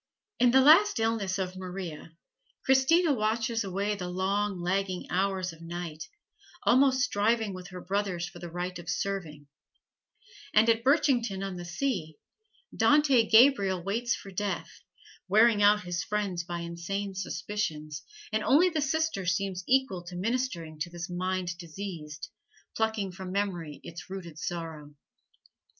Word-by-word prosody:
In 245 0 +5
the 265 +2 +6
last 325 - +6
illness 220 -4 0
of 185 -1 -3
Maria, 180 -4 -6 0.6
Christina 285 +5 +4
watches 225 0 0
away 200 +2 -1
the 185 -3 -5
long, 195 +2 -1
lagging 185 +1 -1
hours 185 -1 0
of 165 - -15
night, 165 -2 -6 0.6
almost 260 +1 +4
striving 220 -3 +1
with 185 -1 -8
her 180 -1 -9
brothers 190 -2 -2
for - - -11
the 175 - -7
right 180 +1 -4
of 175 -1 -8
serving; 165 -5 -3 1.1
and 215 +2 +6
at 230 0 +3
Birchington 250 -8 +2
on 195 -2 -5
the 175 0 -7
Sea, 175 - -2 0.6
Dante 280 -6 +4
Gabriel 220 -7 +5
waits 230 +5 0
for 195 - -10
death, 200 +1 -4 0.5
wearing 215 +2 +5
out 205 0 +5
his 175 -1 -3
friends 200 -5 -2
by 170 0 -5
insane 170 +4 -4
suspicions, 180 -6 -4 0.3
and 215 0 +1
only 335 +7 +5
the 315 -3 -1
sister 300 - 0
seems 190 +1 -1
equal 260 -8 +2
to 175 +1 -8
ministering 185 -7 -2
to 170 +3 -2
this 175 +1 -7
mind 185 -1 -2
diseased, 170 -1 -7 0.5
plucking 220 -3 -1
from 185 0 -7
memory 180 -7 -2
its 170 +3 -9
rooted 170 -5 -7
sorrow. 160 -4 -5
195 Hz, 140 wpm, -29 LUFS, 175-225 Hz, 1.1 s, the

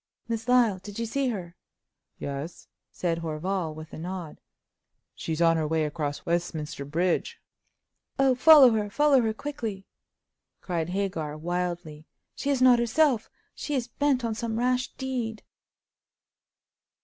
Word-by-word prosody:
"Miss 230 0 -3
Lyle—did 210 -5 +2
you 230 - -1
see 270 +4 -1
her?" 180 -7 -4 0.6
"Yes," 140 +4 -6 0.2
said 170 -2 -1
Horval, 165 +1 -3
with 155 0 -10
a - - -7
nod 175 -1 -6 0.7
"she's 165 +1 -2
on 165 0 +4
her 155 -1 0
way 160 0 +1
across 145 -1 -4
Westminster 165 -4 -2
Bridge." 175 - -1 0.8
"Oh, 270 -1 +4
follow 270 0 +8
her—follow 250 +6 +3
her 220 -1 +1
quickly!" 225 -9 -5 0.7
cried 170 -2 -3
Hagar, 180 -6 -2
wildly, 170 -2 -4 0.3
"she 280 - -3
is 270 -3 +2
not 250 -2 +7
herself; 235 0 +2 0.2
she 295 - -4
is 245 -2 -2
bent 270 -2 +1
on 225 - -1
some 225 0 -3
rash 250 +1 +1
deed!" 245 -5 -4
195 Hz, 130 wpm, -27 LUFS, 165-250 Hz, 0.8 s, follow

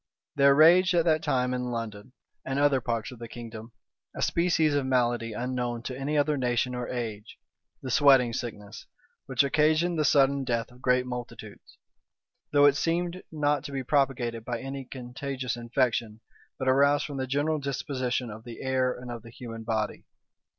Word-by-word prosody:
There 140 -1 +5
raged 175 +4 +6
at 170 -1 +3
that 155 -2 +3
time 125 0 0
in 125 0 -2
London, 115 0 -6 0.3
and 135 +1 -3
other 140 -2 +3
parts 115 -1 -2
of 125 - -11
the 115 - -7
kingdom, 115 -1 -9 0.4
a - - -2
species 170 -3 +2
of 145 -1 +1
malady 120 -3 +1
unknown 120 0 -3
to 130 - -5
any 140 +3 -2
other 150 +1 +2
age 125 -4 +1
or 125 -1 -4
nation, 115 -4 -4 0.6
the 130 - -4
sweating 130 -3 +5
sickness, 105 -3 -6 0.4
which 130 0 +2
occasioned 155 +4 +2
the - - +3
sudden 140 -1 +3
death 120 -1 -2
of 125 +1 -18
great 125 -1 +2
multitudes; 125 -1 -8 0.7
though 145 0 +5
it 145 0 +5
seemed 175 +3 -1
not 145 -3 0
to 145 - -6
be 135 -1 -3
propagated 125 -4 0
by 120 0 -3
any 135 0 -6
contagious 130 0 -5
infection, 120 -2 -1 0.4
but 130 - -4
arose 140 +2 +4
from 145 -2 -6
the 130 0 -2
general 145 +4 0
disposition 130 -4 -2
of 110 +1 -10
the 120 +1 -9
air 130 -1 +1
and 125 -1 -7
of 120 -1 -6
the 115 - -13
human 115 -1 -8
body. 110 -2 -2
130 Hz, 175 wpm, -27 LUFS, 120-145 Hz, 0.7 s, raged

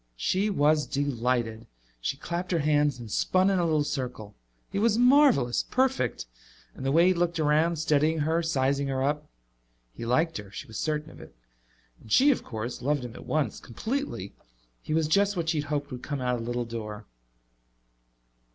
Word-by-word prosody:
She 190 - +1
was 150 -4 +2
delighted. 120 -5 -1 0.3
She 100 - -2
clapped 175 +4 -4
her 175 - +2
hands 145 -3 +2
and 115 -3 -9
spun 185 - +2
in 190 - +2
a - - +2
little 155 -2 +2
circle. 125 -7 -4 0.4
He - - -1
was 220 0 +3
marvelous, 250 - +5
perfect! 260 - 0 0.5
And - - -9
the 135 - 0
way 165 +4 +5
he 180 - +5
had 185 -2 +1
looked 170 -1 0
around, 155 +3 +3
studying 155 0 +2
her, 160 +3 +1
sizing 140 -3 0
her 135 -1 -1
up. 150 +2 -1 0.6
He - - -8
liked 160 +8 +1
her; 100 -1 -10
she - - -8
was 110 - -7
certain 155 0 -2
of - - -13
it. - - -14 0.7
And 110 - -14
she, 285 +3 +6
of 265 - -1
course, 115 +1 -5
loved 140 0 0
him 120 - -8
at - - -11
once, 155 -1 -1
completely. 180 - -4 0.5
He 155 - -2
was 160 -1 +2
just 200 +4 +2
what 165 -1 -1
she 160 -2 +1
had 145 - -9
hoped 145 -1 -2
would 125 -1 -6
come 145 0 -4
out 125 -1 0
of 120 - -2
the 115 - -6
little 120 0 -2
door. 110 -2 -6
150 Hz, 195 wpm, -27 LUFS, 125-170 Hz, 0.7 s, she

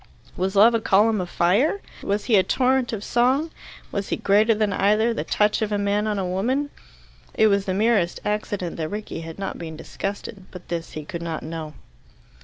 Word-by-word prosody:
Was 190 +2 -2
Love 220 +4 +7
a 230 - +1
column 210 0 +3
of 175 - -5
fire? 205 - +2 0.2
Was 205 +1 -1
he 230 - +3
a 195 - +7
torrent 255 +6 +1
of 215 -3 -4
song? 260 +8 +2 0.4
Was 200 -1 -3
he - - +1
greater 215 +3 +3
than 210 -1 0
either 215 +4 +2
the - - -3
touch 210 +1 +1
of 215 -1 -1
a 205 - +1
man 205 +1 0
on 210 -1 -1
a 190 - -1
woman? 255 +11 -1 0.6
It 220 - +4
was 200 -1 +2
the 185 - -1
merest 205 -4 +2
accident 205 -4 -2
that 160 -1 -3
Rickie 210 -5 -5
had 165 0 -8
not 195 - -5
been 160 -2 -7
disgusted. 195 +3 -6
But 180 -1 -12
this 170 -1 -4
he 155 -1 -6
could 170 +2 -6
not 165 -2 -4
know. 155 -2 -6
205 Hz, 205 wpm, -23 LUFS, 180-220 Hz, 0.6 s, Love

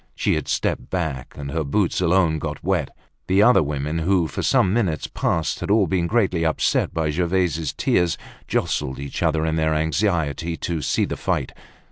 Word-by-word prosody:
She - - +1
had - - -2
stepped - - -1
back, 80 -9 -3
and 70 -1 -5
her 80 +1 -1
boots 90 +6 0
alone 85 -3 +3
got - - -5
wet. - - 0 0.4
The 95 +2 +4
other 125 +3 +6
women, 75 +2 -2
who 90 +1 +2
for 70 - -4
some 95 - +3
minutes 95 - 0
past 80 -1 -1
had - - -5
all 105 -1 +4
been 85 0 0
greatly 95 -6 +1
upset 80 -1 +1
by 80 -2 -1
Gervaise's 85 -2 0
tears, 85 +4 +1 0.3
jostled 65 0 -1
each 70 0 -6
other 80 -2 +1
in 80 0 0
their 80 0 +1
anxiety 80 -1 0
to 85 -3 -3
see - - +1
the - - -4
fight. - - -2
80 Hz, 180 wpm, -22 LUFS, 75-90 Hz, 0.4 s, other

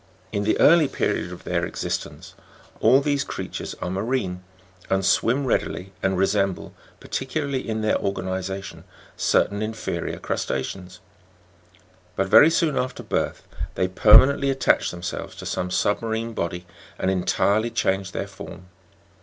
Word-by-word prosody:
In 100 0 -1
the 110 - +1
early 165 -1 +6
period - - -1
of - - -10
their - - -1
existence - - -4 0.5
all 135 +2 +5
these 140 -1 0
creatures - - -6
are 90 - -2
marine, 95 -3 -2 0.5
and 95 0 +1
swim 130 +8 +2
readily, 95 -5 -1
and 95 -1 +1
resem 95 0 +2
ble, - - -11 0.3
particularly 135 -1 -3
in 110 0 -1
their 110 0 +1
organization, 95 0 -4 0.3
certain 100 +1 +1
inferior 110 +1 -3
crus - - -2
ta'ceans; 90 +7 -5 1.1
but 95 - +1
very 145 +10 +7
soon 160 -4 +1
after 125 0 -3
birth, - - -2 0.3
they 95 - +1
permanently 130 +9 +6
attach 135 0 +2
themselves 85 -1 -6
to - - -9
some 90 - -2
submarine 110 +4 -1
body, 90 -2 -3 0.3
and 95 - 0
entirely 100 +4 +1
change 95 -4 0
their - - -3
form. 90 0 -11
100 Hz, 135 wpm, -24 LUFS, 95-130 Hz, 1.1 s, very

